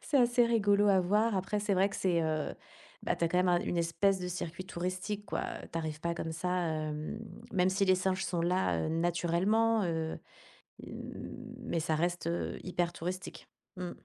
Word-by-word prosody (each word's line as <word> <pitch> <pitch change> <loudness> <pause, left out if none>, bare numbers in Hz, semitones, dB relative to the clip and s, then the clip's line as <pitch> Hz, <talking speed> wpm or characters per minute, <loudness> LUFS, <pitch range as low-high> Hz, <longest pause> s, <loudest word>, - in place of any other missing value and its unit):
c'est 290 - +1
assez 240 -1 +5
rigolo 205 -3 +4
à 195 -2 +5
voir. 210 +4 +2
Après, 195 +3 -1
c'est 205 -2 +1
vrai 190 +2 +4
que - - -6
c'est 175 -3 +2
heu, 155 -1 -1 0.5
bah, - - 0
tu 170 - 0
as - - +2
quand 180 - +2
même 180 0 +3
un 175 -1 +5
une 190 - -2
espèce 180 +3 +2
de 180 - -3
circuit 175 0 -4
touristique, 185 +4 -3
quoi. - - -2 0.3
Tu - - -4
arrives 155 -2 -3
pas 170 0 -1
comme 165 -1 -4
ça, 180 +3 -2 0.2
hem, 155 +4 -3 0.3
même 185 -1 +3
si 195 +1 +2
les 185 - +6
singes 190 +1 0
sont 175 -3 -1
là, 180 +2 +1
heu, - - -1
naturellement, 175 +7 +2
heu, 160 -2 -2 1.4
mais 235 -8 -2
ça 160 - 0
reste, 175 +2 0
heu, 170 +1 -2
hyper 175 -1 -1
touristique. 180 +2 -5 0.3
Mmh. 180 -1 -4
180 Hz, 190 wpm, -32 LUFS, 170-195 Hz, 1.4 s, les